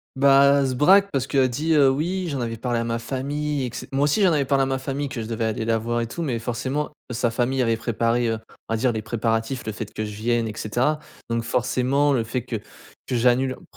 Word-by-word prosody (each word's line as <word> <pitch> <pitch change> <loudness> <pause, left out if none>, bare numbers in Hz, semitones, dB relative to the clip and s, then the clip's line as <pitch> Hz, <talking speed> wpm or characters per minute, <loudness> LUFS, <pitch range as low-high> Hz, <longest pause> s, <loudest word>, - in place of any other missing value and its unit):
Bah 140 +1 +6
elle 135 - +2
se 130 - -2
braque 195 +8 +5
parce 135 -3 0
qu'elle 135 -2 +2
dit: 155 +6 0
«Heu, 140 -3 +6
oui 175 +7 -1
j'en 140 -3 -3
avais 115 -1 -2
parlé 120 0 -1
à 115 - 0
ma 115 0 -2
famille 140 +3 -2
et 120 - -5
cete» 130 - -7
moi 135 +1 +1
aussi 150 +9 +2
j'en 185 -3 +5
avais 145 -3 +2
parlé 135 0 +2
à - - +3
ma 135 0 0
famille 135 +1 -3
que 125 - -5
je - - -6
devais 115 0 -2
aller 110 0 -2
la 115 -1 +1
voir 120 +1 -1
et 115 - -2
tout 170 - -6
mais 130 -7 -1
forcément 130 +6 -3 0.2
sa 120 -1 0
famille 130 +3 0
avait 115 -1 +1
préparé, 115 +1 0
heu, 110 - -1 0.3
on - - 0
va - - +1
dire 125 +2 +2
les 110 -1 -3
préparatifs 115 +2 -2
le 110 - -2
fait 105 0 -6
que 110 - -4
je 105 - -6
vienne 115 +1 0
et 105 - -5
cetera 125 +9 0 0.3
donc 115 0 0
forcément 130 +4 +1
le 120 -3 +1
fait 115 +2 -3
que 115 -3 -3 0.5
que 125 - -1
j'annule 125 +2 +2
p - - -18
125 Hz, 260 wpm, -23 LUFS, 115-140 Hz, 0.5 s, Bah